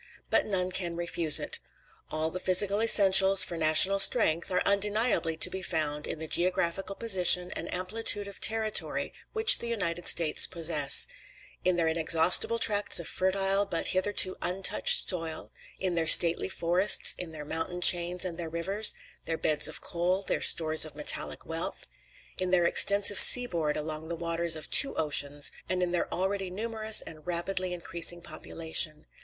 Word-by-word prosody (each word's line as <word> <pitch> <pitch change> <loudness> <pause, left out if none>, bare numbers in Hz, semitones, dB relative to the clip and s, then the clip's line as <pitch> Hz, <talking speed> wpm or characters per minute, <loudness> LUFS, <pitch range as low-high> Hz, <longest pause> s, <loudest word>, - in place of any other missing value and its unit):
But - - -1
none 185 -3 -4
can 175 -2 -5
refuse 170 -2 +3
it. - - -4 0.5
All 155 +1 -5
the 185 - -6
physical 195 +3 +2
essentials 195 -3 +6
for 170 - -8
national 165 +5 +4
strength 170 -7 +2
are 180 - -3
undeniably 205 -4 -1
to - - +4
be 190 - -8
found 150 -4 -5
in - - -6
the 160 +1 -9
geographical 185 +3 -3
position 180 -5 +1
and - - -9
amplitude 205 +2 -2
of 200 - -15
territory 220 -1 -2 0.2
which 440 0 +5
the 235 - -7
United 175 -7 -6
States 165 -3 +2
possess: 160 -5 +1 0.6
in 185 -1 -1
their 170 -1 -3
almost 160 +1 -3
inexhaustible 165 +8 +3
tracts 205 -4 +2
of 170 - -10
fertile, 195 +1 -2
but 185 -5 -7
hitherto 185 0 +1
untouched 185 +2 +1
soil; 165 -3 -5 0.3
in 185 -2 -4
their 165 -1 -4
stately 170 +2 +6
forests, 180 +3 +2
in 175 -3 -9
their 150 -2 -11
mountain 165 +3 -7
chains 175 0 +1
and 175 -2 -8
their 165 -2 -7
rivers, 195 +6 -3 0.3
their 165 0 -6
beds 150 -1 -1
of - - -9
coal, 180 +3 -5
and - - -4
stores 155 -1 +3
of 155 -2 -8
metallic 150 0 -5
wealth; 165 +1 -8 0.5
in 185 -1 -1
their 180 -1 -1
extensive 200 +3 +4
seaboard 170 -12 +5
along 155 +1 -8
the 170 - -7
waters 170 0 -3
of 155 - -10
two 280 - +5
oceans, 145 -2 -2 0.2
and 185 -1 -3
in 175 - -4
their 175 - -5
already 190 +1 -5
numerous 220 +2 0
and 155 0 -14
rapidly 180 +1 -5
increasing 175 -1 -5
population. 160 -2 -5
180 Hz, 165 wpm, -25 LUFS, 165-195 Hz, 0.6 s, essentials